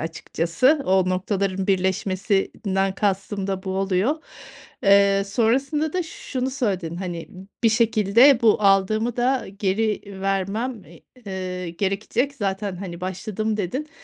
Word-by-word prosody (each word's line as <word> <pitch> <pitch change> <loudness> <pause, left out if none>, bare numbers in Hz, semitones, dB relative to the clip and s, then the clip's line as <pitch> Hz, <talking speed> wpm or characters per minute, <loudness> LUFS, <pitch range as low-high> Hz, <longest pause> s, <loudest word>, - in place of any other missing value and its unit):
açıkçası. 170 - 0
O 185 -1 +3
noktaların 190 0 -1
birleşmesinden 195 0 0
kastım 195 0 -1
da 190 -1 -3
bu 190 - -4
oluyor, 195 - +1 0.7
eee, 200 0 +5
sonrasında 270 +9 +1
da 365 -1 0
şunu 260 -5 -4
söyledin, 190 - -2
hani, 175 -3 -5 0.3
bir 225 - +6
şekilde 225 +3 +4
bu 215 -1 +4
aldığımı 215 +4 +2
da 255 +2 +1
geri 210 +2 0 0.2
vermem, 195 +4 -2 0.4
eee, 185 -2 -4
gerekecek. 210 +9 -1
Zaten, 195 -4 -3
hani, 180 -2 -7
başladım 210 +4 -3
dedin, 255 - -3
195 Hz, 115 wpm, -23 LUFS, 190-230 Hz, 0.7 s, bir